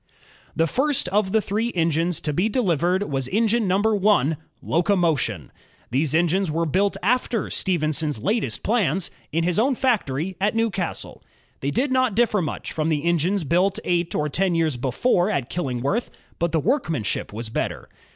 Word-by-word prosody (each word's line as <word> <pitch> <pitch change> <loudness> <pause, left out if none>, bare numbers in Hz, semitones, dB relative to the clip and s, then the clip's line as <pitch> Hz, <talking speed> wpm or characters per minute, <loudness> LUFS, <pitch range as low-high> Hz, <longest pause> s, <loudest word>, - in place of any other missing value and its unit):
The 165 - +3
first 270 - 0
of 195 0 +1
the 220 +1 +3
three 220 +5 -1
engines 165 0 +1
to 150 - -2
be 185 +9 +1
delivered 185 - +1
was 135 -8 -2
engine 220 - +1
number 205 +4 +2
one, 195 -8 +2 0.2
Locomotion. 165 - 0 0.4
These 140 +4 +1
engines 175 +2 +2
were 165 +2 0
built 195 +6 +1
after 235 0 0
Stephenson's 155 -5 0
latest 210 - -1
plans, 195 - +1 0.2
in 165 +2 0
his 175 +2 +1
own 260 +4 +2
factory 190 - 0
at 205 +3 +1
Newcastle. 220 -6 -2 0.4
They 140 - -2
did 260 - 0
not 255 -5 +2
differ 225 -3 +2
much 155 - -4
from 155 0 -1
the 150 -2 0
engines 170 +3 +1
built 180 +6 +2
eight 175 -1 0
or 150 - 0
ten 180 +4 +1
years 160 -4 +1
before 175 - +1
at 140 - -2
Killingworth, 140 - -1 0.3
but 170 0 0
the 160 - +2
workmanship 165 - -1
was 110 +2 -5
better. - - -3
175 Hz, 160 wpm, -23 LUFS, 155-210 Hz, 0.4 s, The